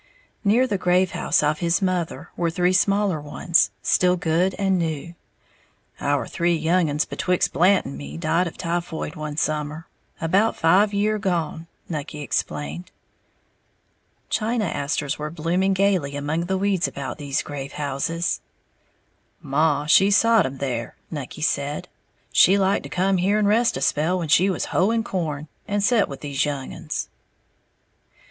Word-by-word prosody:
Near 230 +5 +4
the 205 -6 -2
grave 180 0 +2
house - - +1
of 150 +1 +1
his 170 0 +1
mother 175 -5 -2
were 170 -1 0
three 180 +2 +1
smaller 195 -3 +2
ones, 150 +3 +2
still 180 0 +3
good 175 +2 +1
and 195 -2 +1
new. 165 0 -3 0.9
"Our 145 0 0
three 170 0 +1
young 165 +1 +2
uns 150 +1 0
betwixt 180 -1 0
Blant 185 +3 +4
and 70 - -7
me 70 +2 -7
died 170 - +1
of 165 - -8
typhoid 170 -3 -3
one 150 -1 -5
summer, 155 +1 -2 0.3
about 195 +7 +2
five 190 +6 +4
year' 210 +1 +1
gone," 170 -4 -2 0.2
Nucky 150 -1 -5
explained. 80 - -3 1.4
China 225 0 0
asters 145 -2 -2
were 150 0 -3
blossoming 175 +4 0
gaily 185 -8 +1
among 150 +4 -2
the 190 +2 -1
weeds 195 -2 +1
about 135 0 -6
these 140 -2 -1
grave 140 -2 -6
houses. 150 +4 -2 1.0
"Maw 145 +1 +1
she 190 +6 +5
sot 225 -2 +4
'em 135 +1 -7
there," 125 -4 -3 0.2
Nucky 150 0 -6
said, 145 -1 -1 0.5
"she 195 +2 +6
liked 195 0 +2
to 140 - -9
come 190 +4 +1
here 195 +4 +2
and 210 -1 +2
rest 230 +3 +3
a - - -5
spell 160 +5 +1
when 165 -4 -3
she 180 +6 +5
was 185 - -1
hoeing 225 +5 +2
corn, 155 -8 -3 0.2
and 205 0 0
set 225 -1 +3
with 140 - -8
these 140 -2 -1
young 140 -3 -3
uns." - - -4
170 Hz, 155 wpm, -23 LUFS, 150-190 Hz, 1.4 s, she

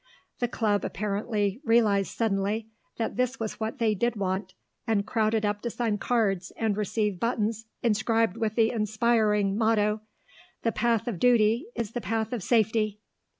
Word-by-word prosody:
The 245 - +1
Club 215 -3 0
apparently 205 +1 -2
realised 215 -5 +2
suddenly 215 0 0 0.3
that 225 0 -2
this 250 +1 0
was 220 -2 -4
what 220 +5 -3
they 225 -4 +2
did 235 +4 0
want, 190 -1 -2 0.3
and 210 -3 +1
crowded 220 -1 +1
up 205 0 -1
to 240 - -2
sign 225 -3 -1
cards 195 -7 0
and 220 -3 0
receive 210 -2 -1
buttons 225 -1 -1 0.2
inscribed 225 -2 +2
with 220 -2 -2
the 225 -1 +3
inspiring 215 -2 +2
motto: 215 -1 +2 0.6
"The 230 - +2
Path 230 +1 +1
of 210 -8 -3
Duty 235 - +3
is 230 -2 -3
the 245 - -4
Path 220 +3 -2
of 235 - -2
Safety." 215 0 +1
220 Hz, 155 wpm, -27 LUFS, 205-230 Hz, 0.6 s, the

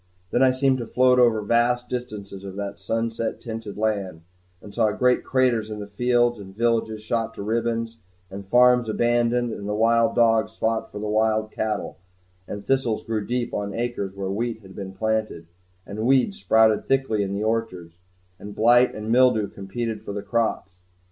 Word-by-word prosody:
Then - - +1
I 130 - +6
seemed 130 0 +1
to 115 - -5
float 125 +1 +3
over 115 -3 +3
vast 120 +3 +1
distances 105 -6 -6
of 95 -1 -8
that 100 0 -5
sunset 115 0 -2
tinted 110 -3 -7
land, 100 -6 -2 0.4
and 100 - -13
saw 110 -3 +2
great 125 +2 +2
craters 125 -5 +1
in 105 - -5
the 105 - -5
fields, 120 +2 +1
and 95 -1 -11
villages 110 -1 0
shot 115 0 -2
to - - -6
ribbons, 115 +1 -2 0.3
and 100 +1 -7
farms 125 +2 +4
abandoned; 120 +1 +1
and 100 0 -6
the 105 - -1
wild 115 +1 +3
dogs 115 -2 +2
fought 110 0 -1
for - - -8
the 105 +1 -4
wild 110 0 +1
cattle; 110 -3 -3 0.5
and 100 0 -7
thistles 130 -5 0
grew 110 -2 -2
deep 120 +2 -2
on 100 0 -3
acres 115 -5 -3
where 95 -1 -3
wheat 115 +2 -3
had 95 -1 -14
been 95 -1 -7
planted, 110 -4 -2 0.4
and 100 +1 -8
weeds 135 +10 +2
sprouted 110 - +3
thickly 135 -6 +1
in 100 0 -2
the 100 - -2
orchards, 95 -7 -3 0.4
and 100 0 -9
blight 120 +3 +4
and 110 +1 -4
mildew 120 -4 +4
competed 110 +4 -5
for 100 - -7
the 100 0 -5
crops. 105 -3 -2
110 Hz, 180 wpm, -24 LUFS, 105-120 Hz, 0.5 s, I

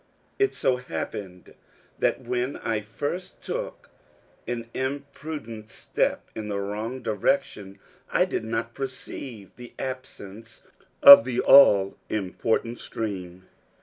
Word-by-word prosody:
It 405 0 +2
so 130 - +1
happened 90 -4 -7 0.5
that - - +1
when 125 +2 -2
I 110 -2 -2
first 145 - -5
took - - -5 0.6
an 115 -1 -4
imprudent 140 -4 -5
step - - -2
in 110 -1 -6
the 100 -1 -2
wrong 110 +6 -4
direction, 105 - -1 0.3
I - - +3
did - - -3
not 115 +1 -3
perceive 130 -5 -7
the 120 -1 -11
absence 115 -4 -8 0.4
of 140 -4 +12
the 125 0 -2
all 100 -8 +6
important 110 +3 -1
stream. 95 -4 -6
115 Hz, 115 wpm, -25 LUFS, 105-130 Hz, 0.6 s, of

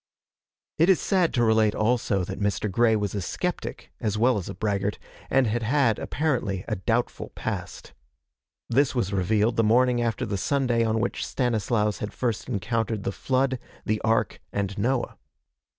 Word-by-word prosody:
It 165 +4 +5
is 190 - +5
sad 185 -4 +2
to 120 - +3
relate 110 -2 +3
also 110 -4 +1
that 95 +2 -5
Mr. 100 0 -1
Grey 115 +2 +3
was 105 -2 -1
a 100 - -2
skeptic - - -4
as 105 -1 -1
well 120 0 +3
as 90 - -7
a - - -6
braggart, 100 0 -1 0.3
and 135 -1 +3
had 115 +2 0
had, 115 -1 +2
apparently, 120 -11 -1
a - - -1
doubtful 115 +6 -1
past. - - -5 0.7
This 135 +3 +2
was 105 -5 0
revealed 105 +4 +1
the 115 - +4
morning 120 +2 +3
after 115 -1 -1
the 100 -2 -2
Sunday 125 -3 +1
on 110 0 +1
which 120 - -2
Stanislaus 110 -3 0
had 105 - -5
first 120 -3 -2
encountered 110 0 -1
the - - -1
Flood, 130 +4 0 0.3
the 110 0 0
Ark, 110 -2 +1
and 100 -1 -2
Noah. 120 +5 -1
115 Hz, 165 wpm, -26 LUFS, 105-125 Hz, 0.7 s, It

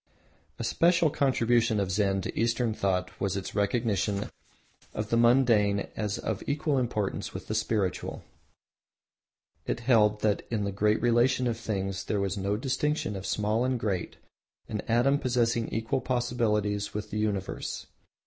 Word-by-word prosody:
A - - -4
special 170 +6 +3
contribution 120 -6 +2
of 95 -2 -1
Zen 95 0 +1
to - - -5
Eastern 115 0 +1
thought 95 -3 -1
was 100 0 0
its 95 - -5
recognition 105 -1 0 0.6
of 105 0 -3
the - - +3
mundane 115 -4 +3
as 105 -2 -2
of 110 -4 -3
equal 145 -1 +1
importance 105 -5 -2
with - - -6
the - - -4
spiritual. 100 -6 -1 1.4
It - - -2
held 105 -4 +3
that 105 -2 +1
in 110 -3 -1
the 100 - -1
great 105 +2 +2
relation 120 +2 +3
of 115 -2 -1
things 95 -3 -3
there 105 - -1
was 100 0 -1
no 100 +1 -1
distinction 135 -1 -1
of 95 0 -5
small 105 +3 0
and 130 -1 0
great, 100 -6 -2 0.5
an 105 -1 -3
atom 125 +5 +3
possessing 120 -3 +1
equal 115 +4 -1
possibilities 105 -5 0
with 105 0 -4
the 105 - -2
universe. 100 -3 -2
110 Hz, 150 wpm, -28 LUFS, 100-120 Hz, 1.4 s, special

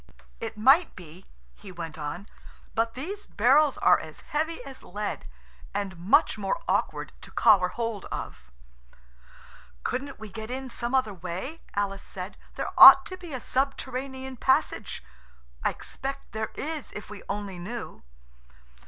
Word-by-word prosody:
"It - - -5
might 270 +10 +5
be," 175 +1 -12 0.3
he 125 - -12
went 165 -3 -6
on, 160 +6 -5 0.5
"but 225 +1 0
these 385 +11 -6
barrels 275 +6 +4
are - - +5
as - - -8
heavy 315 +2 -2
as 270 -1 -9
lead, 205 - -5 0.5
and 195 -2 -2
much 180 +4 +3
more 195 +11 -1
awkward - - 0
to - - -11
collar 205 -6 +5
hold 230 -1 -4
of." 65 +1 -7 1.3
"Couldn't 275 -1 -3
we 220 - -7
get 220 +3 -7
in 260 +1 -4
some 240 +1 -2
other 255 -6 +2
way?" 190 - -6
Alice 200 -1 -1
said. 185 +2 -7 0.2
"There - - -3
ought - - +12
to 370 - -6
be 355 -3 -10
a 260 - -3
subterranean 265 0 -2
passage. 265 +3 +1 0.6
I - - +3
expect 275 +1 -6
there 220 0 -3
is 310 -1 -4
if 210 0 -8
we 210 - -8
only 200 -3 -4
knew." 225 +6 -6
230 Hz, 145 wpm, -27 LUFS, 195-270 Hz, 1.3 s, ought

